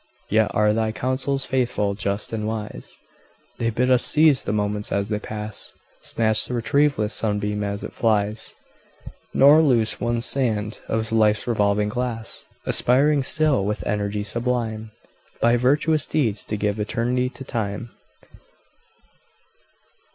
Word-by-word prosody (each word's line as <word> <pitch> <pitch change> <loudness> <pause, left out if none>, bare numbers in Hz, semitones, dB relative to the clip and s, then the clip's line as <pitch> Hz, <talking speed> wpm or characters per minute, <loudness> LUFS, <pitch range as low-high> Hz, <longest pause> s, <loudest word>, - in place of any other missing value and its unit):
Yet 110 0 +3
are 105 0 +3
thy 110 0 0
counsels 130 +3 -1
faithful, 120 -6 0
just, 100 +2 -3
and 105 -1 -2
wise; 105 - -6 0.6
They 115 - 0
bid 125 +3 0
us 125 -1 +4
seize 155 -3 +4
the - - -1
moments 105 0 -2
as 100 +1 -1
they 105 -1 -1
pass 105 0 -7 0.3
Snatch 110 -1 +3
the 125 - -4
retrieveless 120 -2 +1
sunbeam 105 -1 -1
as 100 0 -4
it - - -7
flies, 110 -1 0 0.8
Nor 145 +4 +6
lose 120 -8 +1
one 120 0 0
sand 110 -5 0
of 110 0 -2
life's 105 -2 +2
revolving 105 -3 +1
glass 120 -1 -4 0.2
Aspiring 140 +4 +3
still, 145 -4 +3
with 100 -3 -3
energy 105 0 -2
sublime, 115 -1 -2 0.5
By 120 +1 +3
virtuous 145 +5 +1
deeds 115 -9 0
to 105 - -3
give 105 +1 -1
eternity 120 +4 -1
to 135 - -11
Time. 115 -2 -4
110 Hz, 135 wpm, -22 LUFS, 105-125 Hz, 0.8 s, Nor